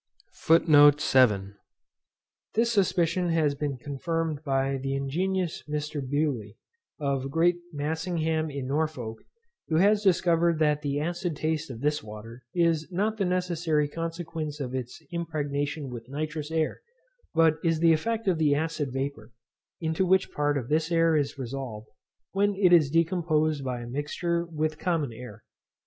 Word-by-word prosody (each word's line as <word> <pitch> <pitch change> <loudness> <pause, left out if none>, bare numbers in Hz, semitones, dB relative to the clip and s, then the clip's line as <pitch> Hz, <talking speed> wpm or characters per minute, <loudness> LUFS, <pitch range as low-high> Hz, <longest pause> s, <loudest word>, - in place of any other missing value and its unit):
This 230 +1 +3
suspicion 185 -3 +1
has 160 -3 +2
been 140 -1 -3
confirmed 155 +4 -3
by 135 -1 0
the 135 +1 -2
ingenious 175 +6 -1
Mr. 150 0 -3
Bewley, 130 -6 -2 0.4
of 135 -2 -1
Great 170 +4 +3
Massingham 160 +1 -1
in 140 -2 -5
Norfolk, 135 -6 -2 0.5
who 160 - -1
has 205 +5 +4
discovered 170 -3 +3
that 150 -1 +2
the 145 -1 -1
acid 175 +1 -2
taste 155 +1 -2
of 120 -3 -8
this 150 +1 +1
water 110 +2 -10
is 165 -1 +1
not 210 +5 0
the 200 - 0
necessary 170 -4 0
consequence 165 -1 -5
of 130 -3 -4
its 130 +4 -5
impregnation 145 -4 -3
with 120 0 -8
nitrous 150 +1 -4
air, 160 -1 -1 0.5
but 160 -1 +4
is 165 -2 +2
the 165 0 +5
effect 225 +7 -1
of 175 -4 +2
the 150 -2 +3
acid 155 -2 -2
vapour, 135 +1 -4 0.5
into 160 +2 0
which 190 +1 +2
part 145 -1 0
of 125 -4 -4
this 155 +3 0
air 165 -1 +3
is 145 -2 0
resolved, 125 -4 -6 0.4
when 200 +1 +1
it 185 -2 +4
is 155 -5 +6
decomposed 155 -2 +1
by 125 -2 -3
a - - -7
mixture 170 +6 -2
with 155 -1 -2
common 160 -9 -1
air. 115 -2 -10
155 Hz, 145 wpm, -27 LUFS, 140-170 Hz, 0.5 s, is